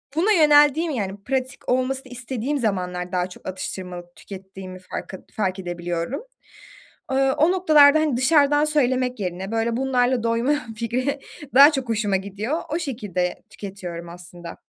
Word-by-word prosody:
buna 380 Hz, +7 st, +2 dB
yöneldiğim 300 Hz, -1 st, +5 dB
yani 200 Hz, -5 st, -4 dB
pratik 260 Hz, 0 st, -3 dB
olmasını 255 Hz, +1 st, 0 dB
istediğim 260 Hz, +3 st, -3 dB
zamanlar 180 Hz, -5 st, -2 dB
daha 180 Hz, 0 st, -1 dB
çok 180 Hz, -, -13 dB
atıştırmalık 180 Hz, -1 st, -6 dB
tükettiğimi 190 Hz, -1 st, -10 dB
farkı 185 Hz, 0 st, -8 dB
fark 190 Hz, -3 st, -1 dB
edebiliyorum. 175 Hz, -, -4 dB, 0.9 s
Iıı, 270 Hz, 0 st, +3 dB
o 325 Hz, +5 st, +4 dB
noktalarda, 310 Hz, -5 st, +6 dB
hani, 305 Hz, -5 st, +1 dB
dışarıdan 290 Hz, +2 st, +4 dB
söylemek 255 Hz, -5 st, +1 dB
yerine 185 Hz, +2 st, -4 dB
böyle 225 Hz, +1 st, 0 dB
bunlarla 255 Hz, -2 st, +1 dB
doyma 230 Hz, +5 st, +1 dB, 0.2 s
fikri 255 Hz, +5 st, -2 dB, 0.3 s
daha 285 Hz, +3 st, +9 dB
çok 265 Hz, -4 st, -3 dB
hoşuma 210 Hz, -3 st, +1 dB
gidiyor. 205 Hz, -, -3 dB
O 320 Hz, -, 0 dB
şekilde 205 Hz, -, -3 dB
tüketiyorum 180 Hz, -4 st, -7 dB
aslında. 175 Hz, 0 st, -10 dB
235 Hz, 135 wpm, -23 LUFS, 185-275 Hz, 0.9 s, daha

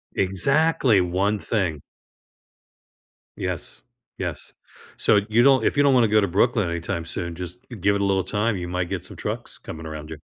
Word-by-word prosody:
Exactly! 120 Hz, -, +4 dB
One 95 Hz, +4 st, 0 dB
thing. 90 Hz, -9 st, -2 dB, 1.6 s
Yes. -, -, -5 dB, 0.3 s
Yes. -, -, -6 dB, 0.4 s
So 105 Hz, -, +3 dB
you 115 Hz, +2 st, +4 dB
don't 135 Hz, 0 st, +5 dB
if -, -, 0 dB
you 145 Hz, -, +5 dB
don't 140 Hz, -1 st, +4 dB
wanna 120 Hz, -3 st, +4 dB
go 105 Hz, 0 st, +3 dB
to 100 Hz, -, +1 dB
Brooklyn 105 Hz, +2 st, +1 dB
anytime 85 Hz, +1 st, -4 dB
soon, 85 Hz, -1 st, -4 dB
just 90 Hz, +4 st, -8 dB, 0.2 s
give 100 Hz, +3 st, +2 dB
it 100 Hz, -, -1 dB
a -, -, +1 dB
little 95 Hz, -1 st, +1 dB
time. 105 Hz, 0 st, -1 dB
You 90 Hz, -1 st, -5 dB
might 90 Hz, 0 st, -3 dB
get -, -, -4 dB
some -, -, -10 dB
trucks -, -, -5 dB
coming 80 Hz, 0 st, -9 dB
around 75 Hz, -1 st, -7 dB
you. 80 Hz, -, -7 dB
100 Hz, 180 wpm, -23 LUFS, 85-110 Hz, 1.6 s, don't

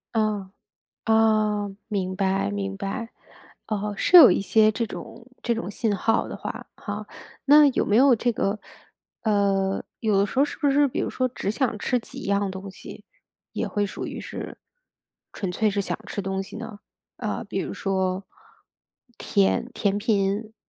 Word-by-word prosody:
哦， 210 Hz, -3 st, 0 dB, 0.5 s
哦， 215 Hz, -2 st, +2 dB
明 185 Hz, -3 st, -2 dB
白， 190 Hz, -, +1 dB
明 100 Hz, -1 st, -3 dB
白。 230 Hz, -, -4 dB, 0.6 s
哦， 210 Hz, -1 st, -2 dB
是 360 Hz, -, +5 dB
有 310 Hz, -, +11 dB
一 -, -, +2 dB
些 215 Hz, +2 st, +4 dB
这 230 Hz, +2 st, -1 dB
种 230 Hz, +1 st, -9 dB, 0.2 s
这 235 Hz, -, +1 dB
种 225 Hz, -3 st, -4 dB
信 215 Hz, 0 st, 0 dB
号 225 Hz, +3 st, +1 dB
的 -, -, -6 dB
话， -, -, -6 dB
哈。 -, -, -6 dB, 0.4 s
那 295 Hz, +1 st, +8 dB
有 265 Hz, -, +1 dB
没 210 Hz, -, +2 dB
有 260 Hz, +1 st, +7 dB
这 240 Hz, +2 st, 0 dB
个， 210 Hz, -1 st, -1 dB, 0.6 s
呃， 200 Hz, -3 st, +1 dB, 0.2 s
有 215 Hz, -4 st, +2 dB
的 200 Hz, -, +3 dB
时 230 Hz, -, -4 dB
候 275 Hz, -, +6 dB
是 290 Hz, -, -6 dB
不 285 Hz, -, +2 dB
是 285 Hz, +1 st, +4 dB
比 -, -, -5 dB
如 -, -, -1 dB
说 255 Hz, 0 st, 0 dB
只 235 Hz, -5 st, -3 dB
想 230 Hz, -1 st, -1 dB
吃 250 Hz, +4 st, +1 dB
几 225 Hz, -, -9 dB
样 200 Hz, 0 st, +1 dB
东 190 Hz, +1 st, -7 dB
西， -, -, -11 dB, 0.5 s
也 -, -, -2 dB
会 205 Hz, -, 0 dB
属 200 Hz, -, -5 dB
于 -, -, -6 dB
是 -, -, -7 dB, 0.7 s
纯 190 Hz, -3 st, -4 dB
粹 215 Hz, +3 st, +1 dB
是 200 Hz, 0 st, -1 dB
想 -, -, -3 dB
吃 200 Hz, -, -4 dB
东 190 Hz, 0 st, -2 dB
西 195 Hz, -, -10 dB
呢？ 225 Hz, -2 st, -7 dB, 0.4 s
呃， -, -, -3 dB
比 -, -, -4 dB
如 -, -, -4 dB
说 190 Hz, -1 st, -1 dB, 0.9 s
甜 200 Hz, +4 st, +1 dB
甜 200 Hz, -1 st, +1 dB
品， 210 Hz, 0 st, 0 dB
210 Hz, 185 characters per minute, -25 LUFS, 195-225 Hz, 0.9 s, 有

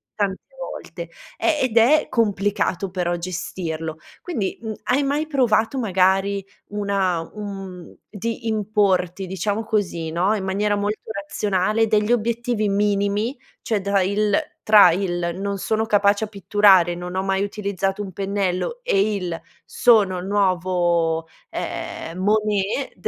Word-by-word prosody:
tante 200 Hz, -2 st, -1 dB, 0.2 s
volte; -, -, -7 dB, 0.3 s
e 310 Hz, -2 st, +1 dB
ed 245 Hz, -3 st, 0 dB
è 280 Hz, +7 st, +5 dB
complicato 205 Hz, -3 st, 0 dB
però 175 Hz, -1 st, -1 dB
gestirlo. 165 Hz, -2 st, -4 dB, 0.2 s
Quindi, 225 Hz, -, -3 dB
mhmm, 220 Hz, -1 st, -4 dB
hai 265 Hz, +3 st, +2 dB
mai 290 Hz, +3 st, 0 dB
provato 250 Hz, -4 st, +2 dB
magari 195 Hz, -2 st, +2 dB, 0.3 s
una 200 Hz, -4 st, 0 dB, 0.2 s
un 195 Hz, -3 st, -7 dB
mhmm, -, -, -17 dB
di 230 Hz, +3 st, -4 dB
importi, 200 Hz, -4 st, +1 dB
diciamo 200 Hz, +4 st, -2 dB
così, 195 Hz, -7 st, -1 dB
no, 185 Hz, +6 st, +1 dB
in 200 Hz, -, -3 dB
maniera 205 Hz, +2 st, 0 dB
molto 205 Hz, +1 st, -1 dB, 0.2 s
razionale, 205 Hz, +2 st, 0 dB
degli 210 Hz, +1 st, +2 dB
obiettivi 235 Hz, -1 st, 0 dB
minimi? 205 Hz, +4 st, 0 dB, 0.2 s
Cioè, 220 Hz, -2 st, 0 dB
da 200 Hz, 0 st, +1 dB
il 205 Hz, +2 st, +1 dB, 0.3 s
tra 210 Hz, -4 st, +8 dB
il 175 Hz, -1 st, -1 dB
“Non 200 Hz, 0 st, -2 dB
sono 220 Hz, +3 st, 0 dB
capace 205 Hz, -1 st, +3 dB
a -, -, -9 dB
pitturare, 195 Hz, -3 st, +4 dB
non 180 Hz, +1 st, -6 dB
ho 190 Hz, -, +1 dB
mai 195 Hz, 0 st, 0 dB
utilizzato 200 Hz, -1 st, -2 dB
un 195 Hz, -2 st, -5 dB
pennello” 195 Hz, -, -2 dB
e 210 Hz, -, +1 dB
il 175 Hz, -4 st, -3 dB, 0.2 s
“Sono 210 Hz, -6 st, +3 dB
il 180 Hz, -, -5 dB
nuovo, 175 Hz, -4 st, +1 dB, 0.2 s
ehm, 165 Hz, +2 st, -5 dB
Monet 210 Hz, +4 st, 0 dB
200 Hz, 135 wpm, -22 LUFS, 185-215 Hz, 0.3 s, tra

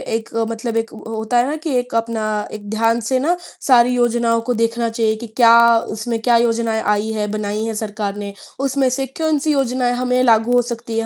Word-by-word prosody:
एक 225 Hz, 0 st, -4 dB, 0.2 s
मतलब 230 Hz, 0 st, -3 dB
एक 225 Hz, 0 st, -2 dB
अ, 220 Hz, -, -10 dB
होता 220 Hz, +2 st, -1 dB
है 240 Hz, +2 st, +3 dB
ना 300 Hz, -, -2 dB
कि 310 Hz, -3 st, -3 dB
एक 245 Hz, -1 st, -6 dB
अपना 230 Hz, -1 st, -1 dB, 0.3 s
एक 205 Hz, -1 st, -8 dB
ध्यान 225 Hz, +2 st, +1 dB
से 260 Hz, -1 st, +2 dB
ना, 325 Hz, +7 st, +1 dB, 0.3 s
सारी 250 Hz, -2 st, +5 dB
योजनाओं 235 Hz, -1 st, +1 dB
को 245 Hz, -, +3 dB
देखना 230 Hz, 0 st, 0 dB
चाहिए 225 Hz, -1 st, 0 dB
कि 235 Hz, -, -6 dB
क्या 230 Hz, +1 st, +5 dB, 0.4 s
उसमें 225 Hz, +1 st, -3 dB
क्या 235 Hz, 0 st, +4 dB
योजनाएँ 230 Hz, -1 st, 0 dB
आई 210 Hz, +1 st, 0 dB
हैं, 210 Hz, -1 st, -2 dB
बनाई 210 Hz, 0 st, -3 dB
हैं 225 Hz, -, -3 dB
सरकार 210 Hz, -2 st, -4 dB
ने। 200 Hz, -1 st, -6 dB, 0.3 s
उसमें 270 Hz, -1 st, +1 dB
से 270 Hz, +2 st, -2 dB, 0.2 s
कौन-सी 310 Hz, -1 st, +1 dB
योजनाएँ 255 Hz, -3 st, 0 dB
हमें 250 Hz, 0 st, 0 dB
लागू 230 Hz, 0 st, +3 dB
हो 245 Hz, -, +5 dB
सकती 235 Hz, -1 st, -5 dB
हैं, 225 Hz, -, -2 dB
230 Hz, 210 wpm, -19 LUFS, 220-250 Hz, 0.4 s, सारी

